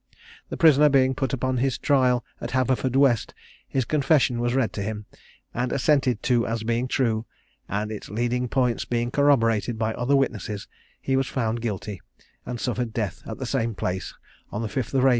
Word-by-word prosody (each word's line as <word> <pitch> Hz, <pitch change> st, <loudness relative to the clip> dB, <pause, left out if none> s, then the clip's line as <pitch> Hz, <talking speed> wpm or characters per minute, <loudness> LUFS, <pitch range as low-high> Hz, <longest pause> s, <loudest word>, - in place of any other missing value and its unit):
The -, -, -5 dB
prisoner 150 Hz, -3 st, +6 dB
being 130 Hz, -1 st, +4 dB
put 135 Hz, -2 st, -2 dB
upon 130 Hz, 0 st, -1 dB
his 130 Hz, +1 st, 0 dB
trial 130 Hz, -4 st, +2 dB, 0.2 s
at -, -, -4 dB
Haverfordwest, 130 Hz, -1 st, +2 dB, 0.3 s
his 130 Hz, -3 st, -1 dB
confession 140 Hz, -4 st, +2 dB
was 120 Hz, +1 st, 0 dB
read 130 Hz, -4 st, +1 dB
to 100 Hz, -, -4 dB
him, 105 Hz, +1 st, -4 dB, 0.5 s
and 125 Hz, +1 st, -1 dB
assented 130 Hz, -4 st, +2 dB
to 120 Hz, -2 st, +2 dB
as 115 Hz, -1 st, -2 dB
being 120 Hz, +2 st, 0 dB
true; 115 Hz, -4 st, 0 dB, 0.4 s
and 105 Hz, +2 st, -2 dB
its 105 Hz, -, -7 dB
leading 120 Hz, +4 st, -1 dB
points 125 Hz, -1 st, +1 dB
being 120 Hz, 0 st, -1 dB
corroborated 120 Hz, -6 st, +2 dB
by 110 Hz, 0 st, 0 dB
other 125 Hz, +5 st, +1 dB
witnesses, 110 Hz, -6 st, -1 dB, 0.3 s
he 135 Hz, -, -1 dB
was 135 Hz, 0 st, +1 dB
found 115 Hz, -2 st, -1 dB
guilty, 105 Hz, -3 st, -4 dB, 0.5 s
and 125 Hz, -1 st, -4 dB
suffered 120 Hz, -2 st, -2 dB
death 105 Hz, -6 st, -3 dB
at 110 Hz, -, -5 dB
the 130 Hz, -, -4 dB
same 115 Hz, -3 st, -1 dB
place 95 Hz, 0 st, -3 dB, 0.4 s
on 105 Hz, -, -3 dB
5th 120 Hz, +3 st, -2 dB
April, -, -, +4 dB
1779. -, -, +7 dB
120 Hz, 180 wpm, -25 LUFS, 110-130 Hz, 0.5 s, 1779